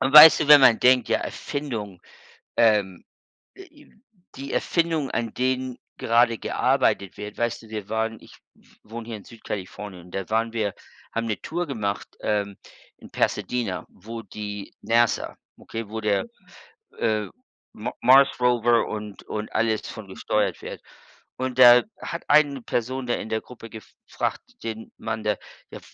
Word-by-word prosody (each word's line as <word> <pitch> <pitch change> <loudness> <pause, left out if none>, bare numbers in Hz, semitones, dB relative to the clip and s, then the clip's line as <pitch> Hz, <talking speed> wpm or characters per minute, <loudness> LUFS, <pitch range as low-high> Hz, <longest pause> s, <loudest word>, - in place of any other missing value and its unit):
Und 130 +1 +1
weißt 155 +2 +11
du, 150 - 0
wenn 145 -1 +10
man 120 -4 +6
denkt, 125 -1 +4
ja, - - +2
Erfindung, 110 -10 -5 0.6
ähm, 105 -5 +3 0.5
äh, 385 - -11
i 300 -4 -21 0.4
die 135 +1 -6
Erfindungen, 165 -5 0
an 115 -2 -2
denen 130 0 -1 0.2
gerade 115 0 +3
gearbeitet 100 -2 0
wird 105 0 -8
weißt 120 -1 -1
du, 110 - -15
wir 105 -2 -6
waren 110 0 -2
ich - - -16 0.2
w - - -26 0.2
wohne 115 +1 -8
hier 115 -2 -5
in 100 - -14
Süd-Kalifornien 100 -4 -7
und 90 - -16
da 95 0 -4
waren 115 +1 0
wir 105 -4 -1 0.4
haben 115 0 -2
'ne 105 - -3
Tour 175 +2 -3
gemacht, 105 -6 -3
ähm, 100 -2 -1 0.4
in - - -14
Pasadena, 100 -8 -1
wo 115 +4 -9
die 105 -2 -7
NASA 115 0 +1 0.2
okay, 115 -2 -7
wo 110 +1 -5
der, 105 -2 +1 0.7
äh, 110 -2 0 0.5
M 110 - -4
Mars 135 +3 +7
Rover 120 -1 +3
und 105 -1 -7
und 105 0 -6
alles 110 -1 +1
von 110 -4 -9
gesteuert - - -1
wird. - - -8 0.6
Und 130 -1 -3
da 120 -1 +9 0.2
hat 170 - -5
eine 145 -2 +4
Person 125 +3 -2
da 120 - +1
in - - -6
der 110 0 -1
Gruppe 115 -2 -12
gefragt, 110 -1 -5 0.2
den 110 -1 -6
Mann 110 -1 -4
da: 105 -1 +1 0.4
„Ja, - - -8
115 Hz, 160 wpm, -24 LUFS, 105-125 Hz, 0.7 s, weißt